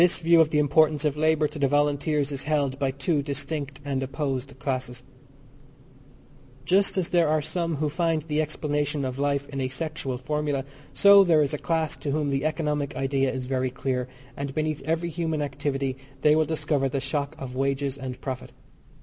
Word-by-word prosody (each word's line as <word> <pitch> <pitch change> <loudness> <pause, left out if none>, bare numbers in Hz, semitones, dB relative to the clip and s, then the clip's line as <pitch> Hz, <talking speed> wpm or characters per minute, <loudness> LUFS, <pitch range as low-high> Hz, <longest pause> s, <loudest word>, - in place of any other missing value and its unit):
This 175 0 +5
view 170 0 +5
of 155 - +3
the 150 - 0
importance 150 +1 +3
of 150 -1 +1
labour 155 0 +2
to 150 +1 -9
the 140 - +3
Volunteers 145 +1 +1
is 135 -2 -3
held 140 -3 0
by 135 - +1
two 140 +3 0
distinct 140 0 -3
and 135 -2 -1
opposed 135 0 -3
classes. 125 -2 -3 1.6
Just 195 +3 +3
as 180 -3 0
there 170 -2 +3
are 155 +1 +2
some 165 +2 -2
who 150 +1 0
find 165 0 0
the 155 -1 0
explanation 150 -1 -1
of 130 +1 -4
life 140 0 0
in 140 -1 -4
a 130 - 0
sexual 135 -1 -3
formula, 145 0 -2 0.3
so 200 0 +7
there 165 -4 +4
is 140 - -1
a 150 - -2
class 160 -2 0
to 145 - -4
whom 145 0 0
the 135 +2 -1
economic 150 -3 -1
idea 135 0 +1
is 130 -1 -4
very 130 0 0
dear, 125 0 -2 0.3
and 140 -1 -5
beneath 155 -2 -1
every 165 +2 -1
human 160 -1 -2
activity 135 -1 -2 0.2
they 150 0 +5
will 155 0 +3
discover 150 -3 0
the 135 +1 -1
shock 140 +2 -2
of 130 -1 -7
wages 135 0 0
and 130 -2 -6
profit. 130 -2 -5
145 Hz, 190 wpm, -26 LUFS, 135-155 Hz, 1.6 s, so